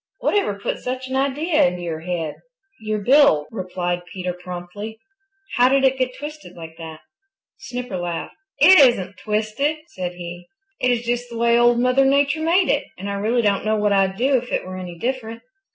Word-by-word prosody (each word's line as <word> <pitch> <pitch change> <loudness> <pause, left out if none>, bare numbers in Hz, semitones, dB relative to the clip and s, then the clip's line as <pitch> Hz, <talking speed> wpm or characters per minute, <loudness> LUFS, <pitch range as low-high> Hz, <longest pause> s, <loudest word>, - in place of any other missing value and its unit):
"Whatever 400 - 0
put 200 - -3
such 255 +1 -4
an 260 - -4
idea 295 +4 +1
into 175 0 -4
your 165 -2 -4
head?" 165 -2 -4 0.4
"Your 215 -1 -2
bill," 225 - +4
replied 180 -3 -3
Peter 180 -1 -4
promptly. 180 +5 -8 0.6
"How 250 +1 +5
did 270 0 +3
it 265 0 +2
get 255 -1 -1
twisted 300 +1 -9
like 165 -1 -10
that?" 160 -1 -9 0.6
Snipper 245 -6 -5
laughed. 175 -1 -4 0.2
"It 360 +5 +8
isn't 200 -9 +4
twisted," 215 +8 -1
said 180 -1 -5
he. 175 0 -9 0.3
"It 250 - +2
is 240 -1 +1
just 240 +1 -2
the 235 - -7
way 235 0 +3
Old 240 0 +4
Mother 255 +2 +3
Nature 285 +3 +2
made 345 +3 +3
it, - - +1
and 200 +2 -5
I - - -2
really 220 +4 0
don't 200 -2 +1
know 215 +1 +1
what 210 -1 +1
I'd 195 -1 +2
do 265 +2 +3
if 245 0 -6
it - - -1
were 185 0 -7
any 180 -2 -7
different." 230 +1 -4
220 Hz, 190 wpm, -21 LUFS, 180-260 Hz, 0.6 s, It